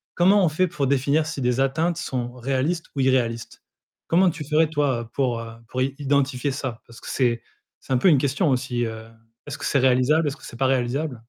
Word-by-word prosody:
Comment 190 +2 +4
on - - +3
fait 185 +4 +1
pour 145 -5 -2
définir 140 +3 +2
si 155 -3 -5
des 125 +1 +1
atteintes 160 +6 +1
sont 125 -6 -3
réalistes 135 +7 -1
ou 135 - 0
irréalistes? 120 -3 0 0.4
Comment 180 +2 +4
tu 160 -2 -6
ferais, 155 +1 +3
toi, 135 -7 -1
pour, 125 -4 0
heu, 115 0 -8 0.2
pour 130 +4 -3
i 135 +1 0
identifier 140 -1 0
ça? 130 -4 -5
Parce 115 0 -14
que - - -11
c'est 120 -3 +1 0.4
c'est - - -11
un - - +4
peu 125 - +3
une 150 - +5
question 145 +5 +1
aussi, 125 -2 0
heu, 110 -1 -6 0.4
est-ce - - -5
que - - -6
c'est 140 - +2
réalisable, 130 +5 +3
est-ce 140 - -7
que - - -14
c'est 120 - -10
pas 135 - +3
réalisable? 130 +2 0
135 Hz, 220 wpm, -23 LUFS, 125-155 Hz, 0.4 s, une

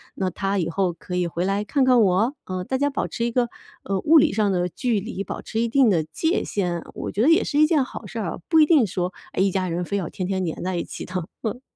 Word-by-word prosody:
那 190 -1 -1
他 195 +3 -1
以 170 -3 0
后 180 0 0
可 180 +2 -7
以 180 -1 +1
回 170 +2 -2
来 200 +1 0
看 270 +5 +1
看 250 -2 +5
我， 210 +6 +3
呃， 185 -1 -4
大 260 +8 -1
家 285 +2 +1
保 275 - -2
持 230 - -4
一 235 - -1
个， 240 -1 +1 0.3
呃， 195 -1 -1
物 320 - +5
理 275 - +4
上 210 -1 +2
的 180 -1 +1
距 230 +2 -1
离， 200 -1 -5
保 - - -6
持 225 - -3
一 235 - 0
定 265 -1 +4
的 170 -6 +2
界 325 - -1
限。 175 -4 -2
我 - - -4
觉 210 - -1
得 285 - +5
也 330 +5 +5
是 290 - 0
一 305 - +7
件 305 -5 +3
好 - - -9
事 - - -8
儿， - - -3
不 320 -2 +5
一 305 - +7
定 300 -7 +5
说 180 -1 -3 0.2
哎 - - 0
一 195 - +3
家 185 -1 -1
人 175 +1 -2
非 200 - -3
要 175 -5 -3
天 185 - -4
天 190 -1 -1
黏 165 -1 -4
在 185 0 -2
一 170 - -1
起 - - -7
的。 185 - -11 0.3
嗯。 230 +3 -3
200 Hz, 305 characters per minute, -23 LUFS, 180-250 Hz, 0.3 s, 一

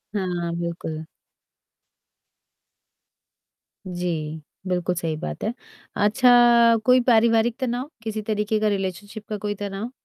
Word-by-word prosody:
हाँ, 175 -3 -2
बिल्कुल। 165 -2 -4 2.8
जी, 165 -4 -3 0.3
बिल्कुल 180 0 -1
सही 165 -2 -2
बात 75 - -6
है। 220 - -1 0.4
अच्छा 235 +1 +5
कोई 255 0 +6
पारिवारिक 230 0 +4
तनाव, 255 +2 -2
किसी 220 -1 -3
तरीके 210 0 -1
का 215 - +1
रिलेशनशिप 200 +1 -3
का 210 - -3
कोई 205 0 -3
तनाव? 205 +3 -5
205 Hz, 105 wpm, -23 LUFS, 180-230 Hz, 2.8 s, कोई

